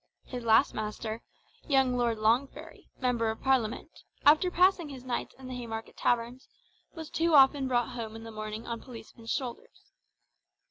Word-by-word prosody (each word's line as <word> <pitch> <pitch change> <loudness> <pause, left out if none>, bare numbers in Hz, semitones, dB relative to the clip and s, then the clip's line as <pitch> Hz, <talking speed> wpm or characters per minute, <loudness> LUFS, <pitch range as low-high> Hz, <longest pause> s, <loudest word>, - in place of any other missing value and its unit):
His 250 -2 -6
last 225 +4 +4
master, 215 +1 -4 0.5
young 270 -3 +3
Lord 240 -2 +1
Longferry, 270 +9 -1
Member 240 -3 0
of 220 - -5
Parliament, 265 +2 0 0.2
after 310 +5 +6
passing 360 -3 +3
his 265 -3 -9
nights 250 -2 -4
in 260 -1 -10
the 255 - -6
Haymarket 225 -2 -6
taverns, 240 +1 -1 0.5
was 320 -2 -8
too 330 -1 +2
often 270 0 +6
brought 240 -2 +1
home 225 -2 -6
in 225 - -9
the 225 - -8
morning 215 +1 -6
on 230 -1 -5
policemen's 230 -2 -11
shoulders. 245 -2 -5
245 Hz, 155 wpm, -29 LUFS, 225-270 Hz, 0.5 s, after